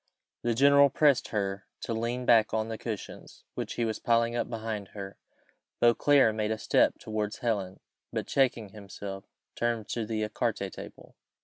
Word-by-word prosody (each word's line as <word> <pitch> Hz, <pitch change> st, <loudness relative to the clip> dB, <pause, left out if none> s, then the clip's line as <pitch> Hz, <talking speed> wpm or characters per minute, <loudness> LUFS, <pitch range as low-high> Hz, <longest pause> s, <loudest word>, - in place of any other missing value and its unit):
The 120 Hz, -1 st, 0 dB
general 140 Hz, +2 st, +6 dB
pressed 145 Hz, -2 st, +3 dB
her 100 Hz, -1 st, -3 dB
to 115 Hz, -, -3 dB
lean 120 Hz, +3 st, -2 dB
back 110 Hz, -2 st, +4 dB
on 110 Hz, 0 st, -1 dB
the 110 Hz, -, -4 dB
cushions 110 Hz, -4 st, -7 dB
which -, -, -4 dB
he 120 Hz, -, 0 dB
was 110 Hz, -1 st, -2 dB
piling 115 Hz, 0 st, +2 dB
up 120 Hz, -, -1 dB
behind 110 Hz, -3 st, -4 dB
her. 100 Hz, -1 st, -7 dB, 0.6 s
Beauclerc 120 Hz, 0 st, +4 dB
made 105 Hz, -1 st, -1 dB
a 110 Hz, -, -1 dB
step -, -, +2 dB
towards 105 Hz, -1 st, -3 dB
Helen, 100 Hz, -6 st, -2 dB, 0.3 s
but -, -, -3 dB
checking 120 Hz, -6 st, +1 dB
himself, 100 Hz, -1 st, -8 dB
he -, -, -55 dB
turned 115 Hz, -3 st, -1 dB
to 115 Hz, -2 st, -2 dB
the 110 Hz, -1 st, -1 dB
ecarté 105 Hz, -, -2 dB
table. -, -, -11 dB
110 Hz, 170 wpm, -29 LUFS, 105-120 Hz, 0.6 s, general